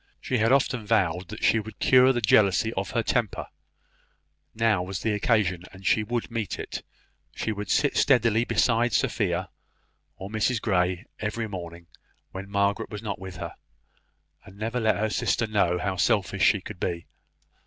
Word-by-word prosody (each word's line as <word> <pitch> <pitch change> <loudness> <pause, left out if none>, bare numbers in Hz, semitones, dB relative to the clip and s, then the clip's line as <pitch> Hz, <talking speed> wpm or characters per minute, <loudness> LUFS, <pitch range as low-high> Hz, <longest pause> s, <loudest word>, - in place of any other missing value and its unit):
She 130 - -1
had 115 +2 +3
often 125 -4 +2
vowed 90 -3 +1
that 110 - -8
she 115 - +4
would 110 +1 -8
cure 130 0 +5
the 120 -2 -1
jealousy 105 +1 +3
of 95 -2 -3
her 115 - 0
temper; 115 -4 -1 1.1
now 110 -4 +2
was 90 0 -5
the 110 - +1
occasion, 105 -5 +1
and 95 0 -14
she 110 - +3
would 120 +2 -3
meet 115 -4 -3
it; - - -6 0.5
she 110 - -2
would 105 -2 -5
steadily 115 -5 +3
sit 120 - -3
beside 115 +1 +2
Sophia 90 -4 0 0.6
or 95 - -8
Mrs 110 +2 +1
Grey 90 -1 0
every 110 +1 -3
morning, 85 -4 -8 0.5
when 95 +1 -7
Margaret 100 0 0
was 105 0 -7
not 100 -4 -4
with 95 -1 -8
her, - - -6 0.9
and 100 -2 -15
never 115 +4 -2
let 110 -1 +2
her 110 +1 -1
sister 115 - 0
know 100 -5 +1
how 95 +1 -2
selfish 100 -1 +2
she 100 - +4
could 100 -1 -9
be. 85 -2 -3
105 Hz, 170 wpm, -26 LUFS, 95-115 Hz, 1.1 s, cure